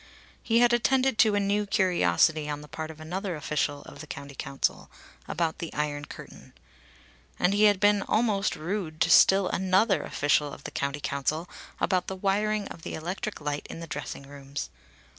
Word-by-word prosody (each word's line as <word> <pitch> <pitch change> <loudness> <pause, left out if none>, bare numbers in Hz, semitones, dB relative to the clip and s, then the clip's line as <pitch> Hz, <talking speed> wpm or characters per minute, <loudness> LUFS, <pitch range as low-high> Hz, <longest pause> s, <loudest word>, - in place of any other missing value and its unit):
He 230 +1 +2
had 240 0 +5
attended 260 0 +2
to 215 -3 +5
a - - +3
new 205 +1 0
curiosity 155 - +2
on 145 0 -3
the 150 - -11
part 160 +1 -6
of 160 -1 -10
another 180 +3 -4
official 145 -1 -2
of - - -12
the 155 - -10
County 140 -2 -8
Council 135 0 -2 0.4
about 165 -1 -1
the 170 -2 -5
iron 145 -1 -2
curtain. - - -12 0.8
And 180 - +2
he 210 +1 +4
had 205 -2 +4
been 205 0 +4
almost 210 -3 +1
rude 165 -1 -4
to - - +3
still 195 -1 +6
another 190 +3 +2
official 145 0 +1
of 140 - -11
the - - -6
County 140 +1 -2
Council 150 +5 -1 0.3
about 185 -1 +1
the 190 - -3
wiring 205 +2 0
of 170 - -10
the - - -5
electric 185 +6 -4
light 145 0 -3
in - - -7
the 165 - -6
dressing 145 -3 -6
rooms. 140 0 -7
170 Hz, 180 wpm, -27 LUFS, 145-205 Hz, 0.8 s, still